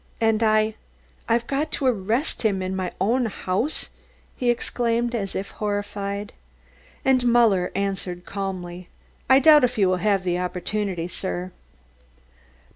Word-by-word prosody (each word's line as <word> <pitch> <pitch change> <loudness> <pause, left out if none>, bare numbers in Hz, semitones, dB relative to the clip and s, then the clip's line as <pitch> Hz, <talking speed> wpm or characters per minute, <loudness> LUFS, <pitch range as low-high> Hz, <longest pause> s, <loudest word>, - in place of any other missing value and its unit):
"And 225 -1 +2
I, 215 0 +3 0.6
I've 235 +1 +2
got 280 +4 -1
to 275 - -1
arrest 235 +4 0
him 195 -4 +1
in 185 +1 -3
my 185 -1 -2
own 235 +6 +2
house?" 205 +7 -2 0.5
he 245 - 0
exclaimed 240 0 0
as 200 -5 -3
if 195 - -4
horrified. 205 -1 -3 0.7
And 260 -2 +4
Muller 225 -7 +4
answered 190 -3 -3
calmly: 185 -3 -5 0.4
"I 265 - +8
doubt 300 +1 +7
if 250 -1 +1
you 195 -3 +4
will 185 0 +2
have 200 0 +1
the 180 -1 0
opportunity, 180 0 -2
sir." 180 0 -4
205 Hz, 135 wpm, -24 LUFS, 185-235 Hz, 0.7 s, I